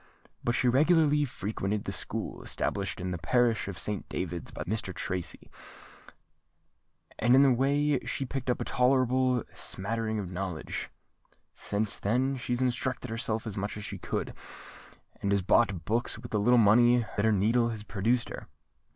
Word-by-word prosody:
But 120 - +1
she 125 - +2
regularly 150 +2 +4
frequented 105 -3 -3
the - - -4
School - - -3
established 100 0 -3
in 90 +1 -3
the 90 - -3
parish 115 +5 +2
of 100 -3 -5
Saint 105 +5 -3
David's 90 -2 -3
by - - -6
the 90 - -6
Rev. 110 - +1
Mr. 95 - -7
Tracy; 90 -2 -4 1.7
and 120 +3 +5
in 135 - +7
that 135 - +5
way 140 +3 +2
she 135 - -3
picked 130 0 -4
up 125 - +1
a - - -3
tolerable 130 -1 +2
smattering 110 +2 -3
of 95 -4 -4
knowledge. 90 -3 -4 0.6
Since 105 0 -1
then 130 +6 +1
she's 125 0 -1
instructed 125 -1 -1
herself 115 -1 -2
as 110 -3 -4
much 100 +1 -3
as 105 - -6
she - - -6
could, - - -3 0.9
and 100 - 0
has 100 -1 +2
bought 95 -3 +2
books 115 +1 -1
with 120 +2 -10
the 105 - +1
little 120 +4 +4
money 120 +2 +5
that 100 - 0
her 110 - +4
needle 115 +4 +3
has 110 -2 -4
produced 115 +4 0
her." - - -8
115 Hz, 170 wpm, -29 LUFS, 100-125 Hz, 1.7 s, in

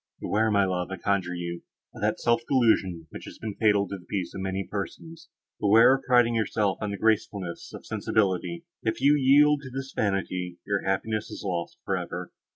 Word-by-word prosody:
Beware, 110 +2 +1
my 100 -2 +3
love, 90 -2 -2
I 95 - -5
conjure 90 -1 -1
you, 85 0 -5 0.3
of - - -11
that - - 0
self 120 0 +2
delusion, 100 - +2
which - - -9
has - - -10
been 110 -2 -5
fatal 105 -1 +2
to 100 +1 -6
the 90 - -18
peace 90 -4 -3
of - - -6
so - - -4
many 95 0 -3
persons; 160 - -7 0.3
beware 110 +5 +6
of 135 - -5
priding 120 -2 +4
yourself 105 -3 0
on 105 - -2
the 100 - -4
gracefulness 100 -5 -1
of - - -10
sensibility; 110 - -1 0.2
if 110 - -1
you 140 +3 +5
yield 145 +1 +5
to 135 - -9
this 135 +1 -6
vanity, 90 -3 -1
your 100 -1 0
happiness 105 +3 -1
is - - -8
lost 85 -3 -3
for - - 0
ever. - - -5
105 Hz, 200 wpm, -27 LUFS, 95-120 Hz, 0.3 s, beware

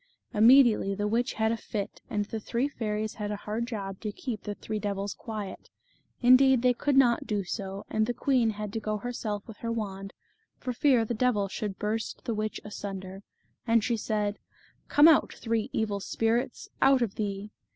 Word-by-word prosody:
Immediately 225 -3 +6
the 205 +1 -1
witch 235 +4 0
had 220 0 +1
a 230 - -1
fit, 205 -2 -5
and 205 -1 -1
the 220 +2 -5
three 235 +5 -1
fairies 215 -5 -3
had 210 -1 -4
a 210 - -2
hard 215 +3 -3
job 195 -5 -5
to 215 - -4
keep 225 0 -5
the 205 - -5
three 215 +1 -4
devils 200 -1 -2
quiet; 210 -4 -7 0.5
indeed, 255 0 +6
they 250 -1 +5
could 280 +3 0
not 245 -3 +4
do 205 -2 0
so, 195 +1 -5
and 215 0 0
the 245 - 0
queen 250 -4 +2
had 210 -1 -5
to 225 - -1
go 215 -1 -2
herself 210 -2 -4
with 220 - -10
her 230 - -3
wand, 195 -3 -4 0.4
for 250 - -4
fear 245 -2 +3
the 235 - -2
devils 215 -5 +1
should 205 -3 -4
burst 220 +1 -3
the 235 - -1
witch 215 0 -2
asunder, 195 -2 -6 0.5
and 230 -1 +4
she 235 +1 +1
said, 210 -1 -1 0.5
"Come 290 +2 +7
out 320 -3 +5
three 225 -2 -2
evil 210 -2 -1
spirits, 230 +5 -1
out 270 -2 +5
of 210 -4 -2
thee." 205 0 -4
215 Hz, 190 wpm, -28 LUFS, 205-235 Hz, 0.5 s, Come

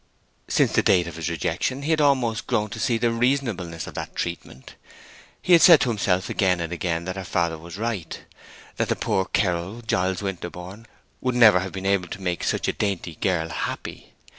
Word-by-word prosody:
Since - - +2
the - - +3
date 90 -2 +3
of 85 - -7
his 85 +1 -3
rejection 130 - -2
he 155 - -1
had 155 -1 +3
almost 130 -6 +1
grown 105 0 0
to 110 - -6
see 115 +1 +1
the 115 +1 +1
reasonableness 115 - -1
of - - -9
that - - -6
treatment. 80 -6 -6 0.7
He 180 - +2
had 170 - +8
said 170 -4 +9
to 125 - +1
himself 95 -4 0
again 90 -3 +1
and 85 0 -4
again 85 -2 -2
that 95 +1 -4
her 95 - -4
father 85 -2 -1
was 85 +3 -10
right; 110 -6 -3 0.6
that - - -1
the - - +2
poor 95 - 0
ceorl, 95 +5 -1
Giles 95 -2 0
Winterborne, 95 +3 -6 0.3
would 125 -1 -1
never 110 -6 +7
have 95 0 -4
been 95 0 -6
able 100 -2 +1
to - - -7
make 90 -2 -2
such - - -1
a - - +1
dainty 95 -5 -2
girl 80 -1 -1
happy. 85 - -5
95 Hz, 200 wpm, -24 LUFS, 85-115 Hz, 0.7 s, said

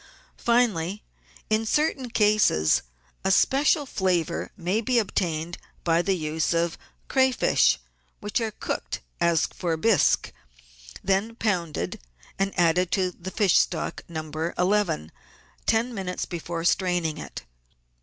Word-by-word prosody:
Finally, 210 -6 +1 0.4
in 215 +1 +1
certain 270 +1 0
cases, 210 - +3 0.4
a - - +1
special 285 - +3
flavour 180 - -1
may 185 +4 0
be 245 +2 +1
obtained 175 -6 -1 0.2
by 170 0 +3
the 190 +2 +1
use 160 0 -1
of 170 0 +1 0.3
crayfish, 260 -1 +3 0.4
which 210 +3 -2
are 225 - 0
cooked, 215 - -4 0.2
as 170 -2 +3
for 165 -2 -3
bisque, 220 +4 +3 0.7
then 195 +4 0
pounded, 180 -9 -2 0.4
and 195 0 +1
added 175 +1 +3
to 185 -2 +1
the 180 +1 -8
fish 195 -2 +2
stock - - -1
No. 155 -2 -5 0.3
11 180 - +1 0.6
ten 230 +2 +2
minutes 190 -4 -3
before 170 -1 -5
straining 175 -4 +1
it. - - -8
185 Hz, 120 wpm, -25 LUFS, 170-220 Hz, 0.7 s, cases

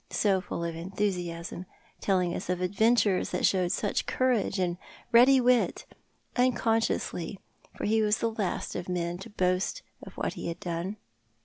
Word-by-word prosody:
So 195 -3 +2
full 170 - -5
of 170 -1 -3
enthusiasm—telling 180 0 -3
us - - -5
of 180 -1 0
adventures 205 +1 +2
that - - 0
showed 180 -2 +2
such 205 +1 -1
courage 245 -6 +1
and 180 -1 -1 0.3
ready 255 +3 +7
wit 250 -1 +2 0.2
— - - -41
unconsciously, 225 -6 0 0.4
for - - -3
he 220 +1 +3
was 210 +1 +2
the 230 - 0
last 210 -4 -3
of 180 +1 -4
men 175 -1 -2
to 195 - -9
boast 185 - 0 0.2
of - - -11
what - - -1
he - - -6
had 170 +1 -4
done. 175 +3 -3
190 Hz, 155 wpm, -28 LUFS, 175-225 Hz, 0.4 s, ready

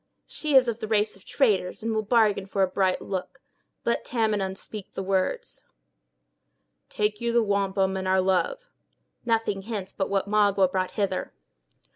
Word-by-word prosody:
"She 300 -3 -2
is 260 -2 +7
of 235 0 -2
a 220 - -3
race 210 -1 +1
of 195 - -20
traders, 210 -8 +1
and 225 0 -1
will 220 - +1
bargain 210 -3 +2
for 195 0 +1
a - - +3
bright 185 0 0
look. 190 -2 -5 0.5
Let 235 - +1
Tamenund 210 -5 -1
speak 210 -1 -9
the 195 - -4
words." 190 -1 -2 1.2
"Take 210 0 -1
you 235 0 0
the 235 0 +3
wampum, 195 -2 +1
and 190 0 -3
our 190 0 +3
love." - - 0 0.5
"Nothing 225 -4 0
hence 195 -2 -5
but 190 - -2
what 195 0 0
Magua 200 -3 +3
brought 185 -1 -1
hither." 200 -3 -1
200 Hz, 165 wpm, -26 LUFS, 190-220 Hz, 1.2 s, is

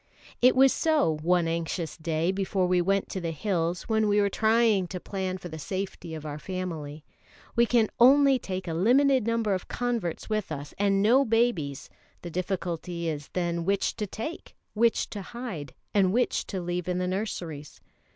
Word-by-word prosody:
It 250 +1 +6
was 265 0 +6
so 300 - +2
one 175 +1 +2
anxious 165 0 -3
day 160 +2 -1
before 190 -1 0
we 180 0 +2
went 195 +2 +1
to 190 - -4
the 170 - -2
hills, 170 0 -1
when 220 -2 +1
we 205 0 +3
were 200 -1 +2
trying 220 -3 +3
to 180 +1 -5
plan 190 0 -3
for 180 - -8
the 160 -2 -8
safety 185 -2 -5
of 155 -1 -8
our 150 0 -5
family. 160 -5 -5 0.5
We 235 0 +4
can 230 -2 +3
only 270 +2 +6
take 185 -4 -5
a 165 - -2
limited 250 - +3
number 230 -3 +1
of 185 - -3
converts 235 -9 -2
with 215 -5 -2
us, 145 -1 -6
and 200 -1 +2
no 250 +6 +5
babies; 225 - 0 0.4
the 175 - -6
difficulty 175 -1 -3
is 145 -2 -5
then 170 -1 -1
which 195 +2 0
to 210 - -2
take, 230 - -7 0.2
which 230 +1 +2
to 205 - -5
hide, 195 - -6 0.2
and 195 -3 +3
which 245 +4 0
to 190 - -3
leave 175 0 -3
in 180 0 0
the 180 - 0
nurseries. 175 -7 -4
190 Hz, 180 wpm, -27 LUFS, 170-220 Hz, 0.5 s, It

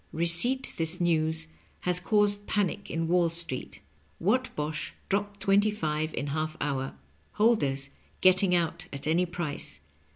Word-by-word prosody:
Re 165 +2 0
ceipt 245 +11 +3
this 165 +2 0
news 160 -2 +1 0.4
has 180 -1 +2
caused 205 +1 +2
panic 205 -1 -1
in 165 0 -1
Wall 175 0 +3
Street. 165 -6 -5 0.4
Whatbosh 190 -8 -1 0.2
dropped 200 0 -1
twenty 200 +2 +4
five 155 -6 -2
in - - -2
half 155 0 -2
hour. 135 -2 -2 0.4
Holders 140 - +2 0.3
getting 185 0 +4
out 175 +1 -1
at 140 - -6
any 170 +4 +2
price. 150 - -3
170 Hz, 135 wpm, -28 LUFS, 155-200 Hz, 0.4 s, twenty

